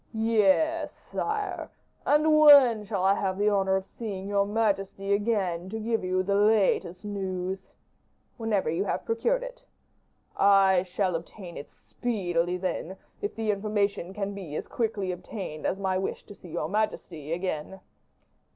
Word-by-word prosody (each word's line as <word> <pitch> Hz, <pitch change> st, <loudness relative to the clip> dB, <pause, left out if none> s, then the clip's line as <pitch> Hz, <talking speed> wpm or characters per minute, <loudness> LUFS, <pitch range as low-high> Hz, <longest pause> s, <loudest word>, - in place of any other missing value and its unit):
"Yes, 225 Hz, -, +2 dB
sire, 420 Hz, -3 st, -4 dB, 0.4 s
and 305 Hz, +1 st, +4 dB
when 275 Hz, -8 st, +8 dB
shall 200 Hz, -3 st, -2 dB
I 195 Hz, +1 st, +5 dB
have 190 Hz, -2 st, -1 dB
the 205 Hz, +1 st, +3 dB
honor 195 Hz, -1 st, +2 dB
of 190 Hz, 0 st, -1 dB
seeing 200 Hz, -3 st, -6 dB
your 200 Hz, 0 st, +1 dB
majesty 200 Hz, -2 st, 0 dB
again, 195 Hz, -5 st, 0 dB
to 220 Hz, +2 st, -4 dB
give 225 Hz, -1 st, -1 dB
you 185 Hz, 0 st, 0 dB
the 200 Hz, +1 st, 0 dB
latest 205 Hz, -3 st, +2 dB
news?" 190 Hz, -2 st, -4 dB, 0.7 s
"Whenever 225 Hz, -5 st, -1 dB
you 165 Hz, +5 st, 0 dB
have -, -, -2 dB
procured -, -, 0 dB
it." -, -, -9 dB, 0.7 s
"I 195 Hz, -2 st, +5 dB
shall 185 Hz, 0 st, -1 dB
obtain 170 Hz, +2 st, -7 dB
it 145 Hz, -, -8 dB
speedily, 180 Hz, -7 st, -2 dB
then, 185 Hz, 0 st, -3 dB, 0.2 s
if 410 Hz, -, -3 dB
the 220 Hz, -1 st, 0 dB
information 200 Hz, -3 st, -1 dB
can 200 Hz, 0 st, -3 dB
be 180 Hz, -7 st, -7 dB
as -, -, -4 dB
quickly 215 Hz, -5 st, -2 dB
obtained 180 Hz, -3 st, -5 dB
as 190 Hz, -, -1 dB
my 190 Hz, -1 st, 0 dB
wish 190 Hz, -, -4 dB
to -, -, -11 dB
see 180 Hz, -, -14 dB
your 155 Hz, -, -2 dB
majesty 175 Hz, -6 st, -2 dB
again." 175 Hz, +1 st, -3 dB
200 Hz, 150 wpm, -27 LUFS, 185-220 Hz, 0.7 s, when